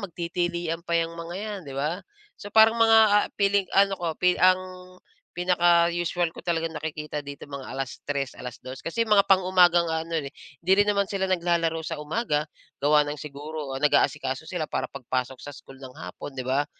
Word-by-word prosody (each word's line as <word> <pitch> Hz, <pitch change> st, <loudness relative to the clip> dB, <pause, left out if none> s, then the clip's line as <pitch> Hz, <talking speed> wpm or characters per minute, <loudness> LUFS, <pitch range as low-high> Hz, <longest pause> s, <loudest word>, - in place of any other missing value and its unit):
magtitilian 175 Hz, -2 st, -3 dB
pa 170 Hz, -, -2 dB
'yang 165 Hz, 0 st, -1 dB
mga 170 Hz, +1 st, -7 dB
'yan, 210 Hz, 0 st, -5 dB
'di 135 Hz, -, -7 dB
ba? 155 Hz, +7 st, -2 dB, 0.4 s
So, 205 Hz, -, -7 dB
parang 220 Hz, +1 st, +7 dB
mga, 225 Hz, 0 st, +7 dB
ah, 205 Hz, 0 st, +4 dB
feeling 200 Hz, 0 st, +3 dB
ano 195 Hz, 0 st, +4 dB
ko, 175 Hz, -, -3 dB
pi 180 Hz, 0 st, +3 dB
ang 185 Hz, 0 st, +5 dB, 0.7 s
pinaka-usual 175 Hz, -1 st, +2 dB
ko -, -, -9 dB
talagang 165 Hz, -1 st, 0 dB
nakikita 150 Hz, 0 st, -5 dB
dito, 140 Hz, 0 st, -9 dB
mga 140 Hz, -2 st, -7 dB
3:00, 135 Hz, 0 st, -4 dB
2:00, 130 Hz, +1 st, -8 dB
kasi 230 Hz, +8 st, -1 dB
mga 210 Hz, -2 st, +4 dB
pang-umaga 180 Hz, -2 st, +5 dB
ang 165 Hz, -, -3 dB, 0.2 s
ano, 165 Hz, -, -6 dB
eh, 140 Hz, -, -7 dB, 0.3 s
'di 185 Hz, -, +3 dB
rin 205 Hz, -, +2 dB
naman 200 Hz, -1 st, +1 dB
sila 195 Hz, -1 st, -1 dB
naglalaro 170 Hz, -2 st, +1 dB
sa 165 Hz, -2 st, -4 dB
umaga, 150 Hz, -3 st, -1 dB, 0.4 s
gawa 150 Hz, +1 st, +5 dB
ng 150 Hz, -, -4 dB
siguro 145 Hz, -1 st, -6 dB
nag-aasikaso 135 Hz, -1 st, +1 dB
sila 175 Hz, -4 st, -2 dB
para -, -, -2 dB
pagpasok 130 Hz, -1 st, -4 dB
sa 145 Hz, -, -7 dB
school 135 Hz, -2 st, -14 dB
ng 130 Hz, -1 st, -10 dB
hapon, 90 Hz, +10 st, -8 dB
'di 130 Hz, -1 st, -5 dB
ba? 135 Hz, +3 st, +1 dB
170 Hz, 180 wpm, -25 LUFS, 145-185 Hz, 0.7 s, parang